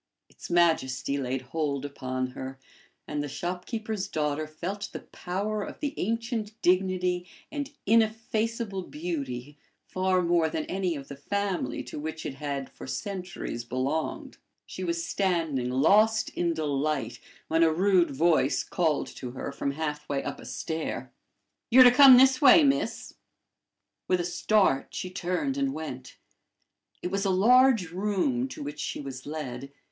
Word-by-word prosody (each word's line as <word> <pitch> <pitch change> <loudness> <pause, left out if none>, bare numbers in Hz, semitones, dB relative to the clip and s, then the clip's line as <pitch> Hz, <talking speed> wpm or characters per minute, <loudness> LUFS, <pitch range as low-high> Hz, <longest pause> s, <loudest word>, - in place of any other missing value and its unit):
Its - - -11
majesty 160 -6 +2
laid 130 0 -2
hold 140 0 -2
upon 130 -2 -3
her, 130 +1 -7 0.5
and 145 - -2
the 145 - -3
shopkeeper's 200 - -4
daughter 155 -3 -1
felt 185 +6 -5
the - - -6
power 205 +4 -3
of - - -7
the 290 -2 -2
ancient 225 0 -3
dignity 180 -1 +1 0.2
and 290 -1 -4
ineffaceable 225 -1 +1
beauty 145 -5 -5 0.3
far 185 -1 +1
more 170 -2 +2
than 155 0 -3
any 185 -3 -1
of 140 -2 -8
the 140 - -8
family 200 +6 -2
to - - -7
which 160 +1 -5
it - - -3
had 140 -1 -4
for - - -10
centuries 185 - -5
belonged. 130 +6 -3 0.3
She 185 - -7
was 170 -1 -1
standing 165 -10 0
lost 210 +12 +4
in 170 -1 -1
delight, 150 -1 -1 0.3
when 160 +1 +2
a 165 -1 +5
rude 180 +1 +3
voice 145 -2 +2
called 160 -4 0
to 125 - -5
her 135 - -5
from 140 - -2
half 150 0 -4
way 140 -1 -1
up - - -5
a - - -11
stair: 160 0 -4 0.6
"You're 255 +2 +9
to 245 - +8
come 265 0 +9
this 265 +2 +5
way, 300 +3 +8
miss." 275 -1 0 0.9
With 185 - +2
a 175 - -1
start, 175 -4 +1
she 185 - -4
turned 185 +10 -2
and 275 -1 0
went. 130 -5 -7 0.9
It 180 - -2
was 195 0 0
a 195 - +1
large 225 -1 +5
room 210 - 0
to 260 - -8
which 145 +1 -6
she - - -3
was 135 -2 -7
led. 140 -3 -5
175 Hz, 150 wpm, -28 LUFS, 145-205 Hz, 0.9 s, You're